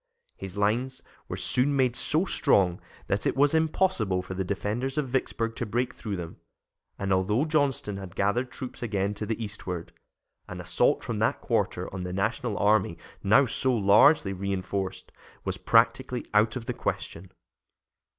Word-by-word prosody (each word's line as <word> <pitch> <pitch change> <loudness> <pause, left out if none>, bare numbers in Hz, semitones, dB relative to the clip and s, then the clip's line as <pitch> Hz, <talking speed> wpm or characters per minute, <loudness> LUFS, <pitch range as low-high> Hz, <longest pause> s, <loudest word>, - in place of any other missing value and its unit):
His 95 0 -8
lines 120 +6 0 0.2
were - - -5
soon 140 +3 +1
made 130 -3 +2
so 160 +8 +1
strong 90 - +2 0.2
that - - 0
it - - 0
was 145 +2 +4
impossible 160 - +1
for 95 - -6
the 95 +1 -2
defenders 105 +8 -2
of 145 -4 0
Vicksburg 115 -3 -1
to 120 - -2
break 120 +4 -1
through 105 -4 -5
them, 85 -3 -7 0.6
and 100 -1 0
although 105 +9 +2
Johnston 140 -10 0
had 95 -3 -9
gathered 120 +6 +1
troops 130 -2 -7
again 100 -4 -1
to 105 +1 -5
the 110 - -1
eastward, 95 -5 -5 0.5
an - - -7
assault - - +1
from - - -3
that - - +1
quarter - - -1
on 95 - -4
the 90 0 -4
National 105 +2 -1
army, 100 -3 +2 0.2
now 110 +8 +5
so 130 +2 +1
largely 100 +2 +5
reinforced, 95 0 -3 0.3
was - - -2
practically - - +2
out 105 +1 +3
of 120 -3 -5
the - - -2
question. 90 +3 -4
105 Hz, 160 wpm, -27 LUFS, 95-130 Hz, 0.6 s, now